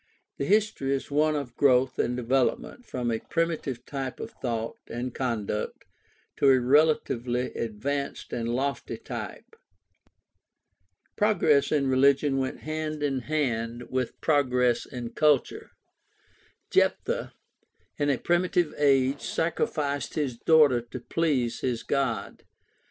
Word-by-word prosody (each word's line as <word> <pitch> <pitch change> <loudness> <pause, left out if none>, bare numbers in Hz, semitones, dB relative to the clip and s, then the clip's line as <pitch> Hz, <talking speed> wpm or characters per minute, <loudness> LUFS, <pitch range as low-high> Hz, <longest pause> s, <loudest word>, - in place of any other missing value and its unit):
The 140 - 0
history 200 -9 +2
is 135 - -6
one 155 +1 +2
of 140 -5 -4
growth 130 -2 +3
or - - +2
development 125 - -1
from 120 -2 -2
a 115 - -1
primitive 165 -6 -2
type 135 -3 -5
of 115 - -6
thought 115 -3 -4
and 120 +1 -4
conduct 110 -5 -3 0.5
to 140 - +4
a 130 -1 +6
relatively 125 -3 +2
advanced 140 +6 -3
and 115 -1 -2
lofty 135 +4 -2
type. - - -8 1.6
Progress 175 -9 +3
in 145 -2 +2
religion 135 +1 +3
went 130 0 -3
hand 155 -1 -3
in 135 -2 0
hand 120 -5 -2
with 130 -1 -2
progress 125 -5 +2
in 120 -3 -6
culture. 150 -3 +1 1.0
Jephthah - - +1 0.7
in 145 0 +1
a 140 - +2
primitive 175 0 +1
age 135 -1 +3
sacrificed 145 -3 -1
his 140 -6 -1
daughter 145 -2 +4
to 120 +2 -8
please 130 -4 0
his 120 -3 -2
God. 130 -7 -2
135 Hz, 120 wpm, -27 LUFS, 125-150 Hz, 1.6 s, a